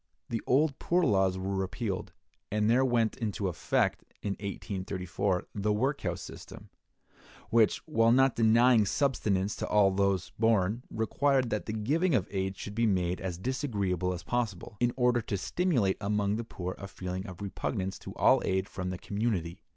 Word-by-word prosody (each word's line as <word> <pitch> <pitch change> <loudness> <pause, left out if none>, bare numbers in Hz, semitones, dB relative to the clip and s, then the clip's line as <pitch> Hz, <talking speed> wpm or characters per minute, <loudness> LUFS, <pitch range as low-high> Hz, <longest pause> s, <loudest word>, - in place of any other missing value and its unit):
(173) 115 - -1
The - - -13
old 140 +1 +3
poor 175 +1 +2
laws 95 - +2
were 95 +1 -2
repealed, 95 +1 -3 0.4
and 105 0 +1
there 120 +4 +4
went 120 -4 +2
into 105 -4 -2
effect 90 - 0 0.2
in 100 - -1
1834 95 -2 -3
the 105 +1 0
workhouse 105 - -1
system, - - -10 0.8
which, 115 -2 +4
while 115 -7 +3
not 135 +1 +4
denying 115 -1 +5
subsistence 105 -8 0
to - - -3
all 100 -2 +4
those 95 -2 0
born, 110 0 +2
required 130 +2 +1
that 105 - -2
the 110 - -2
giving 150 - +1
of 90 - +1
aid 95 -1 -2
should 100 - -6
be 115 +1 +2
made 90 -3 0
as 90 -3 -3
disagreeable 100 - -1
as 90 -1 -5
possible, 110 -6 -3
in 120 0 +2
order 125 -1 +3
to 100 - -3
stimulate 105 - +1
among 100 0 0
the 115 - -3
poor 90 -5 -5
a 100 - -6
feeling 95 +1 -5
of 90 -2 -9
repugnance 95 -1 -3
to - - -9
all - - +4
aid 95 +1 0
from 95 -3 -4
the 90 - -4
community. 100 -5 -2
105 Hz, 170 wpm, -30 LUFS, 95-120 Hz, 0.8 s, denying